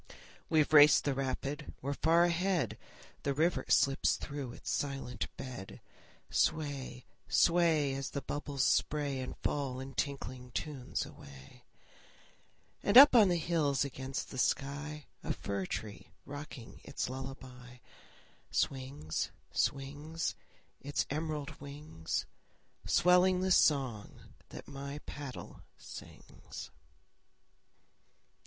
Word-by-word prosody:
We've 155 -1 +3
raced 150 0 +8
the 140 - +1
rapid, 135 +2 -3
we're 140 +2 -2
far 165 +4 +4
ahead! 175 - +1 0.5
The 140 -1 -1
river 165 +4 +1
slips 135 0 +3
through 140 -4 -5
its - - -5
silent 135 -3 -2
bed. 125 -8 -7 0.5
Sway, 140 -5 0 0.2
sway, 165 -5 +3
As 135 0 -3
the 140 - -4
bubbles 145 -2 -2
spray 145 -3 +1
And 130 - -5
fall 135 -3 -1
in 135 +1 -7
tinkling 130 -3 -4
tunes 140 -5 -3
away. 70 -1 -14 1.2
And 205 - +5
up 275 -1 +11
on 215 -5 +8
the 175 - +3
hills 155 -4 +1
against 130 0 -5
the 130 - -5
sky, 145 +3 -1 0.2
A - - -1
fir 100 -2 -3
tree 105 -2 -5 0.2
rocking 145 -4 -9
its - - -3
lullaby, 130 -1 -8 0.7
Swings, 130 - -1 0.2
swings, 145 +4 -1 0.5
Its 145 +1 -1
emerald 150 -2 -3
wings, 140 - -4 0.6
Swelling 180 +1 +5
the 190 0 +1
song 130 - +2 0.2
that - - -9
my 140 0 -6
paddle 140 -3 -8 0.2
sings. - - -10
140 Hz, 110 wpm, -33 LUFS, 130-155 Hz, 1.2 s, up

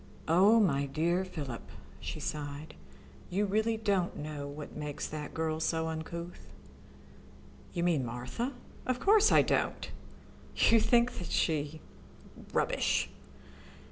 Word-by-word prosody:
"Oh, 195 +8 +6
my 140 -9 +2
dear 170 +6 +1
Philip," 145 -10 -5 0.4
she - - -5
sighed, 145 0 -5 0.6
"you 200 +3 +1
really 220 +3 +1
don't 200 -5 0
know 150 -1 -5
what 145 +1 -8
makes 150 -1 -4
that 150 -1 -5
girl 160 -1 -1
so 160 0 0
uncouth?" 170 +2 -6 1.2
"You 170 - -2
mean 165 -6 +2
Martha? 125 - -3 0.3
Of 255 -1 0
course 425 +4 +5
I - - +7
don't. - - 0 0.6
You 230 - +5
think 240 +2 +3
that 175 -2 -5
she... 155 -1 0 0.7
Rubbish!" - - +1
160 Hz, 120 wpm, -31 LUFS, 150-205 Hz, 1.2 s, I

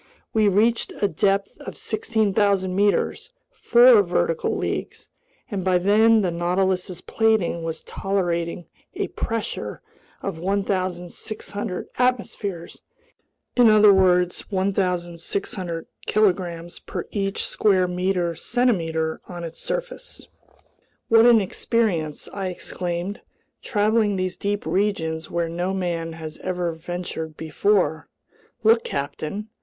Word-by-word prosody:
We 215 -1 +4
reached 220 +4 +2
a 205 - +3
depth 195 +3 +1
of - - -8
16,000 205 -4 +1
meters—four 475 - +3
vertical 485 +3 0
leagues—and 210 - -6
by 185 -1 +3
then 215 +4 +4
the 180 - +1
Nautilus's 180 +1 0
plating 220 -7 +1
was 165 -1 -4
tolerating 175 -3 -2 0.3
a - - -2
pressure 230 -1 -4 0.4
of 190 -5 -4
1,600 185 +1 -3
atmospheres, 230 -8 -1 0.7
in 245 -2 +6
other 210 -1 +7
words, 180 -2 +3
1,600 180 -2 -2 0.2
kilograms 175 -5 0
per - - -6
each 195 -1 -1
square 190 -3 +2 0.5
centimeter 165 -8 0
on 175 -1 -6
its 165 -1 -7
surface! - - -5 0.8
"What 225 +1 +7
an 235 -2 +7
experience!" 190 -6 -1
I 195 -1 -3
exclaimed. 180 +1 -4 0.4
"Traveling 210 -1 +2
these 185 -1 -2
deep 205 0 -2
regions 160 -3 -1
where 170 -1 -1
no 175 +3 -2
man 170 -3 -2
has 160 -1 -8
ever 180 -2 -2
ventured 160 -1 -6
before! 160 0 +1 0.6
Look, 225 +1 +5
captain! 155 +9 -4
190 Hz, 105 wpm, -23 LUFS, 170-210 Hz, 0.8 s, other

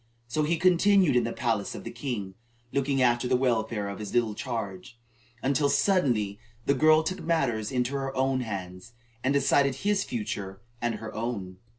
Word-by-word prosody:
So 130 +6 -1
he 160 +3 +1
continued 185 -2 +4
in 120 -2 +3
the 115 - -2
palace 115 -5 -1
of - - -7
the - - -6
king, 115 -6 -4 0.4
looking 140 -1 +1
after 120 0 +2
the 125 - +3
welfare 115 -4 0
of 100 - -6
his 105 +1 -6
little 115 -3 +2
charge, 115 -1 -5 0.5
until 140 +1 +2
suddenly 130 - +2 0.3
the 140 - +3
girl 155 +3 +5
took 185 +3 -3
matters 135 -10 0
into 125 +1 0
her 135 -1 -3
own 130 0 +1
hands, 95 -2 -6 0.3
and 135 - +2
decided 140 -1 +3
his 205 -1 +2
future 100 -4 -4 0.2
and 120 -1 0
her 110 +1 -7
own. 105 -6 -4
125 Hz, 175 wpm, -27 LUFS, 110-140 Hz, 0.5 s, girl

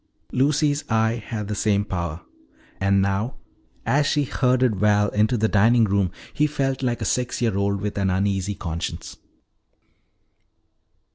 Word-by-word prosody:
Lucy's 145 +2 +1
eye 110 +1 +1
had 105 -3 -5
the 105 - -3
same 105 -1 +1
power. 85 -4 -4 0.6
And 100 0 +3
now 100 +6 -1 0.5
as 145 +1 +2
she 145 - +2
herded 125 -4 +1
Val 105 0 +3
into 110 +4 +1
the 110 0 +2
dining 115 +3 +4
room 100 -3 +1 0.2
he 150 0 +2
felt 135 -3 -2
like 120 -2 -1
a - - -2
six 125 -1 -1
year 115 -5 0
old 100 0 0
with 105 0 -3
an 95 -1 +1
uneasy 95 +1 0
conscience. 85 -3 -5
105 Hz, 145 wpm, -23 LUFS, 100-125 Hz, 0.6 s, dining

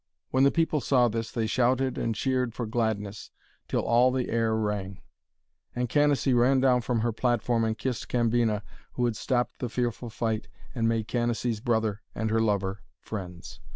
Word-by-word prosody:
When 130 +1 +3
the 140 - +7
people 160 -1 +1
saw 125 0 +3
this, 115 0 -3
they 115 -3 -1
shouted 130 +3 +1
and 115 -1 -1
cheered 125 -1 0
for 120 - -3
gladness 110 -3 -2 0.4
till - - 0
all 120 +2 +4
the 130 -1 -1
air 115 -1 +1
rang. 105 -3 -2 0.8
And 125 -1 -1
Canacee 145 -2 +3
ran 125 +2 +4
down 130 -2 +4
from 115 -1 -1
her 120 +1 +1
platform 120 0 +1
and 110 0 0
kissed 125 -3 -3
Cambina, 115 -3 +1 0.3
who 125 - 0
had 120 -2 0
stopped 125 +2 -1
the 125 - -3
fearful 120 0 -2
fight 110 -1 -2 0.3
and 115 -2 +1
made 115 -1 0
Canacee's 120 -1 -1
brother 110 -3 0
and 110 -1 -1
her 110 0 +2
lover 100 -2 0 0.2
friends. 90 -8 -7
115 Hz, 175 wpm, -27 LUFS, 110-125 Hz, 0.8 s, the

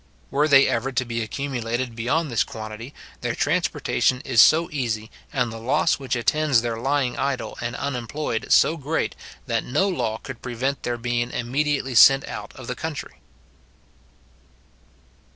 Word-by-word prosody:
Were 145 +2 +2
they 140 -2 +6
ever 130 +1 -1
to 125 0 -1
be 115 -1 -3
accumulated 120 -1 -3
beyond 135 +7 0
this 115 - +2
quantity, 110 +3 -8 0.3
their - - -2
transportation 130 0 +1
is 125 -6 +4
so 165 +2 +5
easy, 115 -6 -3 0.2
and 125 -4 0
the 115 - -7
loss 120 +4 +1
which 135 -2 -2
attends 135 0 +2
their 115 -1 -2
lying 135 0 0
idle 130 -6 -2
and 120 +1 -3
unemployed 125 -2 -3
so 165 - +5
great, 155 +2 -2 0.3
that 115 -3 -1
no 190 +10 +1
law 120 - -1
could - - -9
prevent 130 +3 -2
their 120 -1 -2
being 120 0 -1
immediately 135 +2 -1
sent 135 +3 +7
out 105 0 -7
of 130 - -10
the 125 - -3
country. 160 +3 -6
125 Hz, 150 wpm, -23 LUFS, 115-140 Hz, 0.3 s, sent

